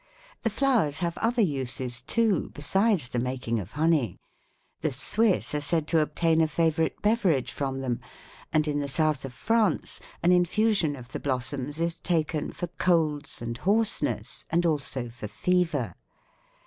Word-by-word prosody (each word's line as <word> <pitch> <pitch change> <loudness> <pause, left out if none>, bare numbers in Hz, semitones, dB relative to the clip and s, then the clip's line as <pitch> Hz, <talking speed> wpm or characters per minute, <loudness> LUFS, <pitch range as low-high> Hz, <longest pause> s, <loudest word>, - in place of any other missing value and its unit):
The 225 - +1
flowers 225 - +2
have 170 -1 -2
other 230 +1 +2
uses, 130 -5 -2
too, 210 - +1
besides 190 - +1
the 125 - -1
making 125 -2 -2
of 100 +2 -8
honey: 155 -5 +1 0.6
the 155 - -1
Swiss 200 - +1
are 150 - 0
said 160 +1 0
to 165 - +4
obtain 160 +1 +2
a 160 - +4
favorite 160 +1 +1
beverage 180 - +2
from 135 -1 -3
them, 125 -3 -2 0.5
and 155 -1 +2
in 145 -1 0
the 145 - -2
South 145 0 0
of 135 - -6
France 220 - 0 0.2
an 175 - +5
infusion 180 -2 +3
of 125 -1 -12
the - - -4
blossoms 135 +2 -2
is 170 0 +1
taken 160 -3 -1
for - - -4
colds 160 -6 0
and 115 0 -4
hoarseness, 210 - +1
and 170 +1 +2
also 140 -6 0
for 115 -2 -7
fever. 165 - 0
155 Hz, 155 wpm, -27 LUFS, 135-180 Hz, 0.6 s, an